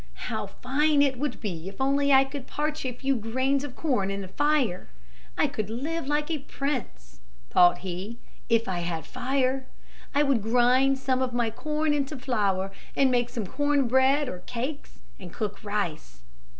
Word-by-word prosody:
"How - - -2
fine 285 +3 +2
it 265 -3 +1
would 290 -2 -2
be 180 -4 -4
if 195 - -14
only 280 +1 +2
I 265 0 +8
could 270 -1 -7
parch 300 -1 -2
a - - -1
few 270 +3 0
grains 260 +5 0
of 285 -4 -7
corn 245 -12 0
in 195 0 -3
the 190 - -6
fire! 285 -6 +1 0.5
I - - +4
could 215 -1 -3
like 280 +6 -3
live 295 0 +1
a 310 - -1
prince," 235 - -4 0.3
thought 175 0 +6
he, 190 +6 -5 0.3
"if 230 -1 +3
I 185 -2 -1
had 170 -2 -3
fire. 260 +1 0 0.5
I 290 - +5
would 275 -6 +2
grind 250 +4 +4
some 260 -1 0
of 255 -1 -1
my 235 -2 +1
corn 305 +4 0
into 285 0 -1
flour 200 -7 0 0.2
and 270 -2 +4
make 245 -1 +2
some 225 -4 -4
corn 290 +4 +1
bread 265 +3 +4
or 180 - -5
cakes 260 +5 -5 0.2
and 180 -3 -9
cook 205 -1 -4
rice." 165 - -3
255 Hz, 175 wpm, -27 LUFS, 210-280 Hz, 0.5 s, I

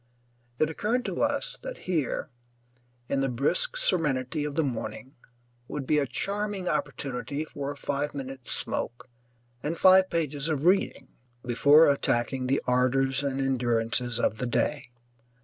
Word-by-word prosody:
It 155 - +3
occurred 220 +10 -1
to - - -2
us - - -1
that - - -6
here, 160 -7 -1 0.8
in 140 - 0
the 135 - +1
brisk 145 - 0
serenity 150 - 0
of 145 -1 -4
the 160 - +2
morning, 130 +1 -4 0.5
would 145 -2 -4
be 150 +2 +3
a 140 - 0
charming 200 - -3
opportunity 140 +1 -2
for 140 -2 -5
a 145 - -4
five 145 +1 -2
minute 135 -2 -7
smoke 120 - -3 0.5
and 155 +5 -2
five 185 +1 +6
pages 150 -2 -1
of 150 -1 -1
reading 190 +2 +2 0.4
before 145 +6 +6
attacking 130 -2 +1
the 135 +2 +1
ardours 130 +1 +2
and 135 -1 -2
endurances 120 -2 0
of 110 - 0
the 125 - -1
day. 140 +3 -1
140 Hz, 145 wpm, -27 LUFS, 130-160 Hz, 0.8 s, five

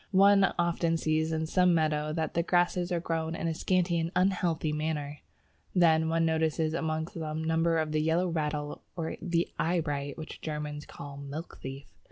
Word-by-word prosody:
One 200 0 +6
often 170 -1 +1
sees 160 0 0
in 160 0 0
some 180 +1 +3
meadow 155 -1 +1
that 160 0 -2
the 170 - +2
grasses 175 +1 +1
are 175 - +1
growing 165 -1 -2
in 165 - -2
a 165 - 0
scanty 175 0 +1
and 165 0 -1
unhealthy 175 -4 +1
manner; 150 -1 -3 0.5
one 185 - +1 0.3
then 165 0 +2
notices 160 -1 +1
amongst 160 +2 -2
them 160 -3 -4
numbers 165 0 +2
of 155 - -6
the 155 0 +1
Yellow 165 +4 +2
Rattle 150 -3 -2
or 165 -2 -3
the 170 -1 0
Eyebright 150 -4 -1
(which 160 -1 -8
the - - -9
Germans 150 -1 -4
call 140 -1 -9
Milk 140 +4 -7
thief). 135 +1 -7
160 Hz, 180 wpm, -29 LUFS, 155-170 Hz, 0.5 s, One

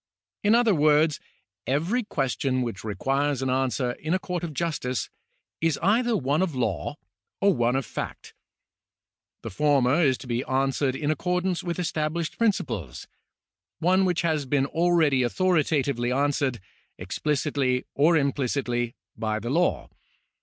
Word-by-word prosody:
In 210 +2 +5
other 235 -3 +4
words, 150 -1 +3 0.5
every 165 - +1
question 135 - -1
which 115 -7 -5
requires 135 +6 -1
an 130 - 0
answer 130 -1 0
in 160 +4 -1
a - - +3
court 180 -1 -4
of 170 - -3
justice 145 -5 -2 0.5
is 165 -2 +1
either 230 +4 +3
one 145 +2 0
of 175 -6 -1
law 110 - -2 0.4
or 200 0 +4
one 120 -2 +1
of 135 -2 -1
fact. - - -6 1.1
The - - -5
former 145 - +3
is 135 -5 +4
one - - -14
to 135 - -10
be 120 +1 -1
answered 135 0 0
in 150 +2 -1
accordance 180 +2 -1
with 175 -1 -3
estab 155 -3 -1
lished 170 0 -3
principles 120 - -1 0.4
— - - -66 0.3
one 185 +3 +3
which 180 -2 +1
has 155 -4 0
been 135 0 +2
already 160 -3 +2
authoritatively 140 -4 +1
answered, 140 -2 0 0.4
explicitly 140 -3 -1
or 160 +4 +4
implicitly, 130 -4 -1 0.2
by 110 -1 -2
the 120 +3 -4
law. 175 +4 +1
145 Hz, 145 wpm, -26 LUFS, 130-170 Hz, 1.1 s, In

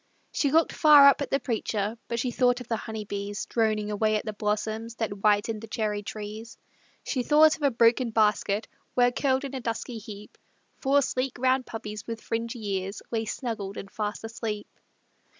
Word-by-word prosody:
She 285 - +1
looked 320 +3 +3
far 295 -3 +8
up 280 - +5
at 280 - -2
the 275 - +1
preacher, 220 -4 -2
But 235 - -2
she 245 +1 -1
thought 245 0 +2
of 250 - -9
the 230 - 0
honeybees 205 -2 -5
Droning 215 -2 0
away 215 +1 +1
at 210 - -2
the 215 - -3
blossoms 215 +2 -2
That 225 -2 -2
whitened 210 +2 +1
the 225 - -8
cherry 215 -2 -2
trees. 215 +2 -7 0.5
She 260 - -1
thought 305 +4 +5
of - - -16
a 285 - +4
broken 235 0 +3
basket, 210 -1 +1 0.3
Where 245 0 +4
curled 265 +1 0
in 275 - -6
a 265 - -4
dusky 230 0 -4
heap, 210 -1 -11 0.4
Four 280 +1 +3
sleek, 255 0 -2
round 255 +1 +2
puppies, 215 -2 -7
with 230 -1 -4
fringy 225 -3 -3
ears. 195 +2 -7
Lay 225 -1 -1
snuggled 215 -4 -4
and 195 - -8
fast 210 -2 -4
asleep. 225 -2 -4
225 Hz, 185 wpm, -27 LUFS, 210-250 Hz, 0.5 s, far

